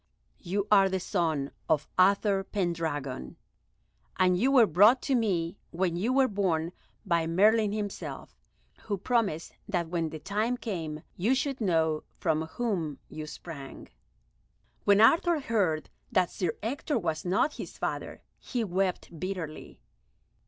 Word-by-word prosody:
You 195 +3 -2
are 195 -2 +6
the 190 0 -1
son 160 -7 -1 0.2
of 155 -2 +2
Uther 195 +1 +4
Pendragon, 160 - -3 0.8
and 185 -1 +4
you 245 +9 +2
were 255 -4 +7
brought 210 +8 +6
to 275 - 0
me 190 -7 0
when 175 0 -1
you 205 +8 0
were 265 0 +4
born 180 -6 0 0.3
by 170 -4 +1
Merlin 210 +5 +4
himself, 205 -1 -5 0.5
who 205 -2 -1
promised 200 -6 0 0.2
that 175 -5 -1
when 165 -2 -1
the 155 - -6
time 210 +9 -1
came 165 -10 -5
you 225 +9 +2
should 265 -1 -2
know 160 -5 +2
from 160 0 0
whom 170 -6 -2
you 155 0 -7
sprang." 150 -3 -9 1.0
When 200 0 +5
Arthur 330 +7 +5
heard 195 - 0 0.2
that 185 -6 +2
Sir 180 -4 -1
Ector 280 +4 -1
was 160 -6 -2
not 190 +12 +1
his - - -7
father, - - -4 0.2
he 245 -3 -2
wept 185 -4 -2
bitterly. 180 -4 -6
185 Hz, 140 wpm, -29 LUFS, 165-215 Hz, 1.0 s, were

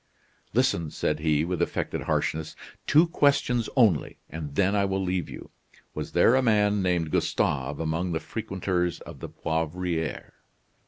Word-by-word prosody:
"Listen," 80 -2 +2
said 75 +1 -1
he, 75 0 +2
with 90 0 -2
affected - - -1
harshness. 80 0 -1 0.3
"Two 155 +4 +6
questions 140 -7 +2
only, 110 - +3
and 75 -3 -6
then 100 +3 +2
I 100 - +3
will 95 -1 0
leave 90 -1 -1
you. - - -10 0.4
Was - - -5
there 115 - +5
a 130 - +4
man 105 -4 +3
named 90 -4 0
Gustave 70 +1 0
among 80 +2 -1
the 80 - -1
frequenters 95 -5 -2
of - - -10
the - - -7
Poivriere?" 80 0 -3
90 Hz, 150 wpm, -26 LUFS, 80-105 Hz, 0.4 s, Two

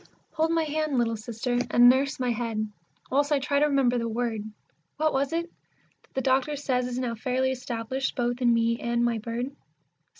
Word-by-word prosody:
Hold 320 0 +1
my 330 0 +2
hand, 310 -2 -1
little 230 -1 +1
Sister, 235 +3 -2
and 240 0 +6
nurse 265 +2 +3
my 250 -1 +1
head, 225 -2 -2 0.4
whilst 285 +3 +2
I 295 - +4
try 280 +1 +1
to 300 - +4
remember 265 -4 +2
the 230 0 -2
word, 230 -1 -1 0.6
What 310 +1 +1
was 270 +2 0
it? 335 +1 0
that 340 - -32
the 265 - +1
doctor 265 +3 +1
says 255 -3 0
is 250 0 -4
now 250 -2 -1
fairly 255 +3 0
established 255 +1 -3
both 245 0 -1
in 240 -1 +4
me 230 0 +2
and 235 0 0
my 235 -2 0
bird. 240 +5 -4
250 Hz, 195 wpm, -27 LUFS, 235-275 Hz, 0.6 s, and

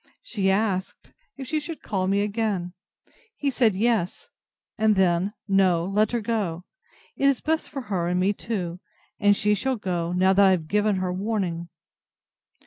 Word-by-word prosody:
She 200 - -1
asked, 190 -1 -1 0.2
if 265 -2 -7
she 310 - 0
should 310 +2 -8
call 190 -2 -1
me 200 +1 +2
again? 205 -4 -1 0.6
He 280 -1 -1
said, 230 -6 +2
Yes; 210 -3 0 0.5
and 215 -1 +3
then, 190 +1 +2
No, 185 -4 +3
let 210 +3 +1
her 240 -1 -1
go; 205 -6 -2 0.5
it - - -1
is 275 -3 +3
best 320 +1 -1
for 275 - -5
her 190 -7 -2
and 180 +1 0
me 195 +3 +2
too; 185 -6 -4 0.4
and 205 -1 +4
she 210 0 +2
shall 260 +6 0
go, 175 -5 -2
now 185 +1 +3
I 200 0 +6
have 175 -4 +1
given 210 +2 +2
her 185 -1 -1
warning. 185 -4 -2
200 Hz, 165 wpm, -25 LUFS, 185-220 Hz, 0.6 s, I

